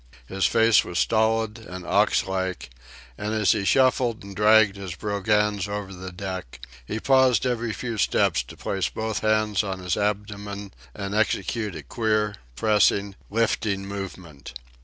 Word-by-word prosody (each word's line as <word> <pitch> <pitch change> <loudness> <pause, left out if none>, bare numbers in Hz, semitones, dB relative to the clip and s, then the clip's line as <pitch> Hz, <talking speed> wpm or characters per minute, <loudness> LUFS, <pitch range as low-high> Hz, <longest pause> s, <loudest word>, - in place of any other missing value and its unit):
His 95 +5 +1
face 115 -1 +4
was 85 - -5
stolid 110 +1 +1
and 90 -5 -9
ox 100 +4 +2
like, 95 -6 -3 0.5
and 105 +1 -2
as 105 -2 +3
he 100 - 0
shuffled 125 -2 +2
and 100 -1 -10
dragged 105 0 +5
his 95 -3 -6
brogans 105 0 0
over 100 -1 -5
the 95 0 -8
deck 90 -8 -6 0.2
he 105 - -4
paused 130 -2 +4
every 120 -2 -1
several 115 0 -4
steps - - +2
to - - -12
place 95 -2 -2
both 110 -1 -3
hands 110 -1 +1
on 95 -2 -3
his 90 -2 -2
abdomen 100 -1 -3 0.2
and 100 -1 -5
execute 105 -1 0
a 80 - -7
queer, 110 +3 0 0.2
pressing, 100 - +2 0.2
lifting 105 -2 0
movement. 95 -9 -8
105 Hz, 150 wpm, -24 LUFS, 95-110 Hz, 0.5 s, dragged